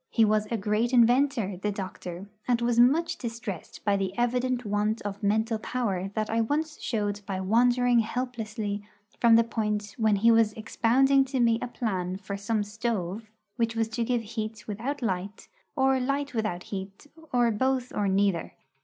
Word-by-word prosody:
He 225 - +4
was 215 0 +1
a 230 - -1
great 215 +4 0
inventor, 240 -4 +3
the 205 +3 -2
doctor, 185 -1 -6 0.2
and 245 -2 +2
was 235 0 +1
much 330 +7 +4
distressed 225 - -6
by 200 -1 +3
the 195 0 -3
evident 245 +1 0
want 210 +2 0
of 205 0 -5
mental 220 +2 +1
power 200 -6 -2
that 215 -1 0
I 225 +1 +1
once 300 +6 -2
showed 205 -3 -2
by 190 -2 -2
wandering 240 +4 +3
helplessly 220 -3 -3 0.4
from 235 -1 +6
the 230 - +6
point 210 -3 -2
when 220 -2 +3
he 225 +4 +4
was 225 -2 +4
expounding 260 +5 +3
to 265 0 -2
me 230 -1 +3
a - - -2
plan 190 -7 -2
for 200 0 -6
some 205 +2 -1
stove 215 -1 -3 0.3
which 230 -1 0
was 225 -1 0
to 235 +1 -2
give 240 0 0
heat 215 -1 -5
without 245 +7 -4
light, 195 0 -3 0.3
or 265 -1 +3
light 275 +2 -1
without 215 -6 -2
heat, 195 +4 -7 0.3
or 240 -2 +3
both 255 +3 0
or 205 - 0
neither. 195 -2 +1
225 Hz, 170 wpm, -27 LUFS, 205-245 Hz, 0.4 s, from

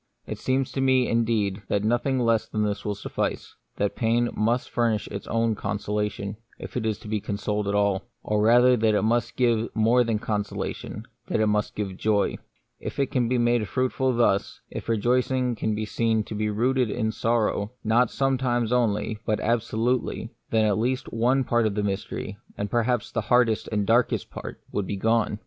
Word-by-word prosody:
It - - -6
seems 130 0 0
to 135 - -2
me, 130 -1 +3
indeed, 110 -4 +1
that 100 - 0
nothing 120 +4 +1
less 115 -3 +2
than 105 -1 -1
this 100 -1 -2
will 105 -1 -2
suffice; 100 - -3 0.2
that 100 0 -1
pain 120 +1 +1
must 115 +4 0
furnish 115 -3 +1
its 100 -1 -6
own 115 0 +1
consolation, 105 0 -3 0.2
if - - -9
it 115 -3 -1
is 110 -2 -1
to - - -10
be 105 -1 -1
consoled 105 0 -2
at 100 - 0
all; 100 0 +1 0.2
or 105 0 0
rather 120 +3 +6
that 110 -2 +2
it - - +2
must 115 +2 +1
give 120 -2 +2
more 115 +3 +4
than 115 -2 0
consolation 105 -2 -4
— - - -45
that - - 0
it 110 - +3
must 105 0 0
give 95 -3 -4
joy. 105 -1 +1 0.4
If - - -6
it 140 -2 0
can 120 -3 +1
be 125 - +2
made 120 -2 +2
fruitful 130 +3 0
thus, 110 -4 +1
if - - -6
a - - +4
rejoicing 125 +2 +1
can 110 -1 -1
be 110 +1 -2
seen 110 0 +1
to 110 - -8
be 105 0 -1
rooted 125 +3 +1
in 110 0 -1
sorrow, 110 -1 0
not 115 +2 +3
sometimes 125 -4 0
only, 110 -3 +1
but 105 - 0
absolutely, 120 +2 0 0.2
then 110 -1 +3
at 105 -1 +2
least 125 +3 -1
one 125 +4 +2
part 120 -2 +2
of 100 - -3
the 105 - 0
mystery, 100 0 -3 0.2
and 100 0 -3
perhaps 120 -1 0
the 115 - -1
hardest 115 0 +2
and 105 -1 +1
the - - -3
darkest 115 +3 +2
part, - - -8
would 100 -2 -2
be 100 - -3
gone. 110 0 +1
110 Hz, 200 wpm, -25 LUFS, 105-120 Hz, 0.4 s, rather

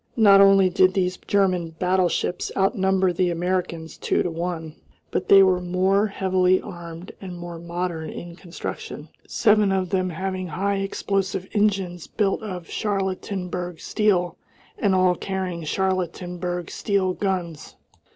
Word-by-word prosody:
Not 200 -3 +7
only 195 -1 +6
did 185 +1 +3
these 185 -1 +1
German 180 -5 0
battleships 180 0 0
outnumber 190 -2 +2
the 180 +1 +1
Americans 170 -2 -2
two - - +1
to 175 - -2
one, 165 -2 -4 0.4
but - - -2
they 195 -1 +9
were 185 -1 +3
more 190 +3 +2
heavily 185 -2 +2
armed 170 -2 -9
and 185 -2 -7
more 175 -1 -7
modern 170 -1 -4
in 170 0 -8
construction 175 -1 -7 0.2
seven 210 -3 +3
of 190 -1 -1
them 185 -1 +1
having 185 +2 -3
high 195 +5 -1
explosive 195 -1 -2
engines 195 -5 0
built 200 -1 0
of 180 -6 -6
Charlottenburg 185 -4 -3
steel, 185 -5 +1 0.4
and 200 -2 +2
all 185 -1 +4
carrying 185 -2 -4
Charlottenburg 180 0 -2
steel 195 -3 0
guns. 180 -6 -3
185 Hz, 130 wpm, -24 LUFS, 175-195 Hz, 0.4 s, they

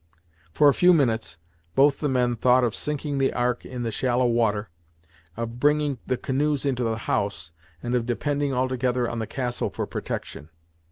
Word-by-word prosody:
For 145 - +4
a 140 - +6
few 180 +5 +5
minutes, 115 - 0 0.4
both 140 +1 +4
the 150 - 0
men 125 -2 +1
thought 125 +2 +4
of 120 -3 +1
sinking 145 -1 -2
the 135 - +2
Ark 120 -1 -1
in 125 -1 -5
the 115 - -2
shallow 125 +2 +1
water, 110 -5 +1 0.7
of 115 +1 -5
bringing 145 -1 +2
the 130 - 0
canoes 145 +2 -1
into 130 -3 0
the 115 -1 -1
house, 100 -6 -2 0.3
and 120 - -2
of 120 -1 0
depending 145 +3 -1
altogether 125 -1 0
on 120 - -4
the 110 - -3
castle 125 -2 -2
for - - -4
protection. 75 +3 -6
125 Hz, 175 wpm, -25 LUFS, 115-140 Hz, 0.7 s, a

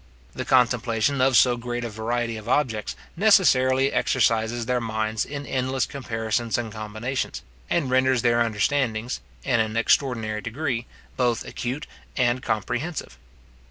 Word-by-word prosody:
The - - -4
contemplation 125 0 +2
of 130 -1 +4
so 125 -1 +5
great 120 0 -4
a 120 - -3
variety 115 +2 -2
of 110 +1 -7
objects 120 -7 0 0.2
necessarily 135 -9 +4
exercises 115 -1 +1
their 125 0 0
minds 110 -1 -1
in 145 0 -6
endless 130 -1 0
comparisons 115 -3 -2
and 115 -2 -3
combinations, 110 +4 -4 0.3
and 135 - +1
renders 130 -1 +2
their 120 -1 +3
understandings, 115 +1 0 0.2
in 125 -4 +2
an 110 0 0
extraordinary 115 -3 +1
degree, 120 0 -3 0.3
both 120 -2 +1
acute 130 +5 -4 0.3
and 125 0 +2
comprehensive. 120 - -3
120 Hz, 130 wpm, -24 LUFS, 110-130 Hz, 0.3 s, so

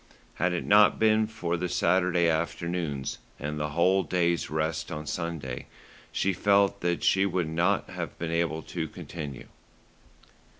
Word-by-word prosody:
Had 90 +1 +3
it 85 - -2
not 105 0 +6
been 110 0 +3
for 90 -6 -2
the 90 +1 -2
Saturday 90 0 +2
afternoons, 85 -3 -2 0.2
and 75 +1 -4
the 75 0 -1
whole 95 +3 +4
day's 85 -2 0
rest 80 +1 -2
on 75 -1 -5
Sunday, 75 -6 -4 0.4
she 95 - +1
felt 100 +1 +3
that 85 0 0
she 95 - +4
would 90 -4 0
not 85 +5 +1
have - - -5
been 80 -1 -3
able 85 -1 0
to 80 -3 -4
continue. 75 -4 -8
85 Hz, 145 wpm, -28 LUFS, 80-90 Hz, 0.4 s, not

